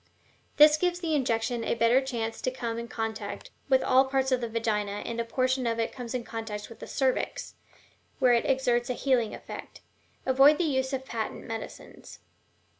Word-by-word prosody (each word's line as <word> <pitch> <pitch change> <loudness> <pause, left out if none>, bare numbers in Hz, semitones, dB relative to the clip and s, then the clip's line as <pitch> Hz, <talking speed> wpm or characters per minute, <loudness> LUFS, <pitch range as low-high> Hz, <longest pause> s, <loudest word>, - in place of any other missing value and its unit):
This 300 0 +8
gives 355 +1 0
the 330 -3 -2
injection 235 -4 0
a - - 0
better 230 +3 +4
chance 230 -4 -4
to - - 0
come 235 -3 -4
in 235 - -6
contact 225 -2 -5 0.2
with 265 -1 +4
all 260 +1 +5
the 265 - -8
parts 265 0 +1
of 255 -1 +2
the 235 - -3
vagina, 210 -3 -1
and 235 0 -2
a - - -1
portion 255 +1 0
of 230 0 0
it 225 - 0
comes 245 -1 -6
in 245 - -2
contact 220 -2 -6
with 230 -1 -12
the - - -8
cervix, 265 -2 -1 0.6
where 255 -2 +4
it 235 - +2
exerts 250 -3 +1
a 250 - -1
healing 250 -5 +1
effect. - - -10 0.4
Avoid 270 +3 +6
the 355 - +1
use 265 -4 0
of 265 -1 -3
patent 225 -4 -4
medicines." 225 -1 -8
245 Hz, 190 wpm, -28 LUFS, 230-265 Hz, 0.6 s, This